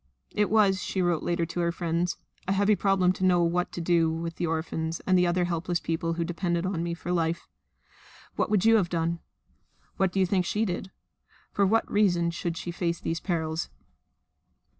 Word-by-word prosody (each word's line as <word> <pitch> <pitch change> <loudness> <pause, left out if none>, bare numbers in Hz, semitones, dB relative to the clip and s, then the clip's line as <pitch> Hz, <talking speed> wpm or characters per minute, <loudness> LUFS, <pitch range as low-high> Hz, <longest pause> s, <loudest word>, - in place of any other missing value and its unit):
"It 210 -1 +1
was," 200 -3 +3
she 190 - -3
wrote 175 -3 +1
later 170 -1 0
to 170 +2 -5
her 170 0 +1
friends, 170 0 -1 0.3
"a 190 - +2
heavy 205 +2 +3
problem 195 -2 +2
to 185 - -5
know 180 -2 +4
what 175 +1 0
to 175 - -4
do 165 -1 +3
with 165 +1 -4
the 175 - -1
orphans 160 0 -2
and 185 -1 +3
other 175 0 +2
helpless 175 0 -1
people 165 0 -2
who 170 0 -1
depended 175 0 -1
on 185 -3 -1
me 170 0 -2
for 175 +1 -5
life." 170 -1 -1 0.9
What - - 0
would 210 -1 +2
you 225 0 +7
have 185 -5 +1
done? 170 0 -1 0.8
What 190 -2 +2
do 195 - -1
you 190 - +4
think 185 0 +1
she 210 +5 0
did? 190 0 -3 0.6
For 200 -1 +2
what 225 +3 +3
reason 175 -5 +2
should 170 0 -3
she 175 - -4
face 170 -1 -2
these 165 0 -2
perils? 160 -2 -2
175 Hz, 195 wpm, -27 LUFS, 170-190 Hz, 0.9 s, you